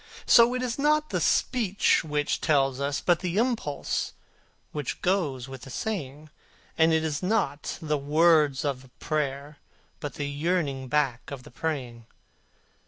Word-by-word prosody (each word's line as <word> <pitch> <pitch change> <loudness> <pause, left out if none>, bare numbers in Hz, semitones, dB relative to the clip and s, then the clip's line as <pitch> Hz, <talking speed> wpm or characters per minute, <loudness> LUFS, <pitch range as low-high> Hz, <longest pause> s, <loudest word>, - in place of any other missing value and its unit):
So 235 +1 +6
it 255 - -2
is 245 +1 -3
not 305 +1 +2
the - - 0
speech 215 -6 +2
which 150 -2 -1
tells, 135 -4 +2 0.2
but 175 -2 +3
the 180 0 -3
impulse 225 - -1 0.6
which 150 -4 -4
goes 150 -10 0
with 135 -2 -9
the 135 - -10
saying; 150 - -5 0.4
And 160 0 +4
it 160 0 +2
is 150 -2 -2
not 185 -8 -1
the 150 -2 0
words 150 -1 +3
of 135 -3 -1
the 130 - -17
prayer, 145 -1 -3 0.4
but 145 -4 -6
the 145 - -3
yearning 145 -3 -1
back 135 -3 0
of 135 -3 -7
the - - -14
praying. 125 -6 -4
150 Hz, 150 wpm, -27 LUFS, 140-180 Hz, 0.6 s, So